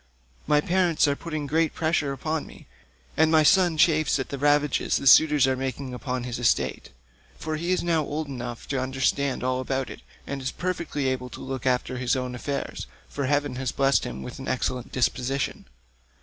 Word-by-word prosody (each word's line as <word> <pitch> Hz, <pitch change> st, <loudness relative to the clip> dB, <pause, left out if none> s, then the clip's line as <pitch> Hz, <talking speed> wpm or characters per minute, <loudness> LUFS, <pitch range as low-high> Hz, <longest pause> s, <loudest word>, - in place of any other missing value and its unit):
My 150 Hz, 0 st, +4 dB
parents 175 Hz, -2 st, +2 dB
are 140 Hz, -, +1 dB
putting 155 Hz, -1 st, -5 dB
great 160 Hz, +2 st, +1 dB
pressure 155 Hz, -3 st, 0 dB
upon 155 Hz, +4 st, -3 dB
me, -, -, -14 dB, 0.5 s
and 160 Hz, 0 st, +4 dB
my 160 Hz, -1 st, +5 dB
son 175 Hz, -1 st, +4 dB
chafes 155 Hz, -2 st, +3 dB
at 135 Hz, -, -4 dB
the 140 Hz, -, -5 dB
ravages 145 Hz, 0 st, +2 dB
the -, -, -5 dB
suitors 150 Hz, 0 st, +7 dB
are 130 Hz, 0 st, +1 dB
making 130 Hz, 0 st, -4 dB
upon 125 Hz, 0 st, -3 dB
his 125 Hz, -1 st, -4 dB
estate, 120 Hz, -, 0 dB, 0.5 s
for 155 Hz, 0 st, -3 dB
he 170 Hz, +3 st, -2 dB
is 185 Hz, -, +1 dB
now 170 Hz, -2 st, +2 dB
old 150 Hz, +2 st, -3 dB
enough 120 Hz, -3 st, -6 dB
to 135 Hz, -2 st, 0 dB
understand 130 Hz, +1 st, 0 dB
all 130 Hz, 0 st, 0 dB
about 130 Hz, 0 st, -2 dB
it -, -, -10 dB, 0.2 s
and 140 Hz, -1 st, -5 dB
is 130 Hz, -, -2 dB
perfectly 170 Hz, -6 st, -2 dB
able 130 Hz, -1 st, -2 dB
to -, -, -10 dB
look 130 Hz, -1 st, -4 dB
after 125 Hz, 0 st, 0 dB
his 125 Hz, 0 st, +1 dB
own 125 Hz, -1 st, -3 dB
affairs, 140 Hz, +3 st, -4 dB, 0.2 s
for 140 Hz, -, -3 dB
heaven 145 Hz, -2 st, 0 dB
has 130 Hz, -1 st, -2 dB
blessed 135 Hz, 0 st, +2 dB
him 65 Hz, +2 st, -6 dB
with -, -, -8 dB
an -, -, -7 dB
excellent 130 Hz, -1 st, -2 dB
disposition. 130 Hz, +1 st, -1 dB
140 Hz, 190 wpm, -25 LUFS, 130-155 Hz, 0.5 s, suitors